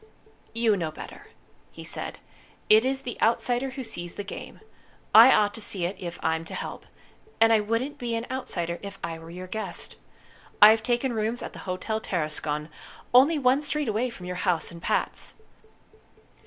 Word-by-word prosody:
"You 230 Hz, -2 st, +3 dB
know 170 Hz, -5 st, -2 dB
better," 155 Hz, -, -10 dB, 0.4 s
he -, -, -10 dB
said. -, -, -4 dB, 0.5 s
"It 215 Hz, +1 st, +8 dB
is 265 Hz, +1 st, -1 dB
the 245 Hz, -, -6 dB
outsider 245 Hz, +3 st, +2 dB
who 265 Hz, 0 st, -6 dB
sees 175 Hz, -7 st, -5 dB
the 205 Hz, -, -4 dB
game. 200 Hz, -, -8 dB, 0.5 s
I 230 Hz, +4 st, +10 dB
ought 205 Hz, -3 st, +3 dB
to 225 Hz, -, -7 dB
see 190 Hz, -4 st, 0 dB
it 185 Hz, +4 st, -3 dB
if 175 Hz, -1 st, -6 dB
I'm 160 Hz, 0 st, 0 dB
to -, -, -7 dB
help. -, -, -6 dB, 0.5 s
And 225 Hz, 0 st, +6 dB
I 220 Hz, -, +5 dB
wouldn't 230 Hz, +7 st, -2 dB
be 235 Hz, -2 st, -2 dB
an 230 Hz, +1 st, -3 dB
outsider 175 Hz, -10 st, -3 dB
if 200 Hz, -1 st, -8 dB
I 165 Hz, -1 st, -4 dB
were 165 Hz, 0 st, -12 dB
your 180 Hz, +2 st, -7 dB
guest. 215 Hz, +4 st, -3 dB, 0.6 s
I've 220 Hz, +1 st, +8 dB
taken 240 Hz, +2 st, 0 dB
rooms 225 Hz, +2 st, -2 dB
at -, -, -7 dB
the -, -, -10 dB
Hotel 215 Hz, +4 st, -2 dB
Tarascon, 150 Hz, -4 st, -2 dB, 0.4 s
only 275 Hz, +6 st, +6 dB
one 265 Hz, 0 st, +3 dB
street 300 Hz, -1 st, -1 dB
away 225 Hz, +4 st, 0 dB
from 190 Hz, -6 st, -10 dB
your 180 Hz, 0 st, -4 dB
house 180 Hz, -3 st, 0 dB
and 170 Hz, 0 st, -11 dB
Pat's." -, -, -1 dB
220 Hz, 180 wpm, -26 LUFS, 175-245 Hz, 0.6 s, I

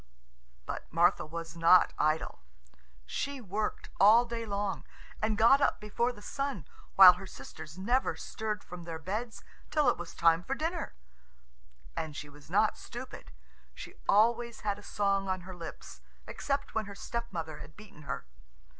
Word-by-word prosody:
But -, -, -6 dB
Martha 170 Hz, 0 st, +3 dB
was 165 Hz, 0 st, -6 dB
not 170 Hz, +2 st, +6 dB
idle. 155 Hz, -, 0 dB, 0.7 s
She 280 Hz, -, -3 dB
worked 210 Hz, -1 st, -3 dB
all 220 Hz, +4 st, +7 dB
day 230 Hz, -1 st, -5 dB
long, 200 Hz, -1 st, -2 dB, 0.4 s
and 215 Hz, -1 st, +1 dB
got 240 Hz, +5 st, +6 dB
up -, -, +2 dB
before 235 Hz, +4 st, 0 dB
the 210 Hz, -4 st, -14 dB
sun, 275 Hz, -, -3 dB, 0.3 s
while 185 Hz, -2 st, +11 dB
her 190 Hz, +2 st, -9 dB
sisters 145 Hz, +2 st, -10 dB
never 240 Hz, +8 st, +1 dB
stirred 215 Hz, -3 st, -4 dB
from 175 Hz, -1 st, -9 dB
their 165 Hz, -1 st, -5 dB
beds 215 Hz, +8 st, -5 dB, 0.3 s
till 300 Hz, -4 st, +3 dB
it -, -, +1 dB
was 175 Hz, -1 st, -7 dB
time 165 Hz, 0 st, +4 dB
for 270 Hz, -, -2 dB
dinner. 320 Hz, -, -3 dB, 1.0 s
And 155 Hz, -2 st, -4 dB
she 145 Hz, -, -7 dB
was 145 Hz, 0 st, -16 dB
not -, -, +2 dB
stupid. -, -, -9 dB, 0.4 s
She -, -, -9 dB, 0.2 s
always 235 Hz, +3 st, +3 dB
had 205 Hz, -1 st, -1 dB
a -, -, -12 dB
song 200 Hz, -1 st, 0 dB
on 185 Hz, -1 st, -1 dB
her 185 Hz, +1 st, -9 dB
lips, 170 Hz, -2 st, -9 dB, 0.2 s
except 280 Hz, 0 st, -3 dB
when 220 Hz, -1 st, -1 dB
her 200 Hz, 0 st, -9 dB
stepmother 180 Hz, -9 st, -5 dB
had 150 Hz, +1 st, -12 dB
beaten 210 Hz, -7 st, -14 dB
her. 140 Hz, -, -5 dB
200 Hz, 160 wpm, -31 LUFS, 170-230 Hz, 1.0 s, while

